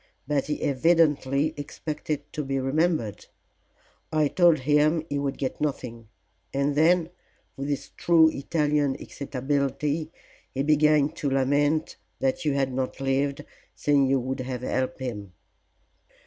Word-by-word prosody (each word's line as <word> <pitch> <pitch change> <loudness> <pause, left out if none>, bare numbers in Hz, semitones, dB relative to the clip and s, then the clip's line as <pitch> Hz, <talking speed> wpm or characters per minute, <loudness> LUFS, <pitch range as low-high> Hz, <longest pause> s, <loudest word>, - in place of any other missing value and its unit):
But 145 -2 0
he 150 - -3
evidently 150 -1 +2
expected 150 0 -4
to 150 - -3
be 135 0 -1
remembered. 135 - 0 0.8
I 155 -2 +2
told 170 -4 +4
him 150 +3 +2
he 145 0 -1
would 140 -1 -2
get 135 +1 -4
nothing, 120 -6 -3 0.4
and 140 +1 0
then 165 +3 +3 0.4
with 140 +1 -4
true 165 -2 +5
Italian 145 -1 0
excitability 140 +3 -2 0.4
he 135 - 0
began 150 -1 +4
to 155 -2 -3
lament 145 +3 +1 0.2
that 135 +5 -1
you 150 - +2
had 135 -2 0
not 130 0 -3
lived, 140 +2 -1 0.3
saying 140 -2 +2
you 135 0 +2
would 130 +2 -4
have 125 -1 -4
helped 130 +1 -2
him." 105 -7 -5
145 Hz, 130 wpm, -26 LUFS, 135-150 Hz, 0.8 s, true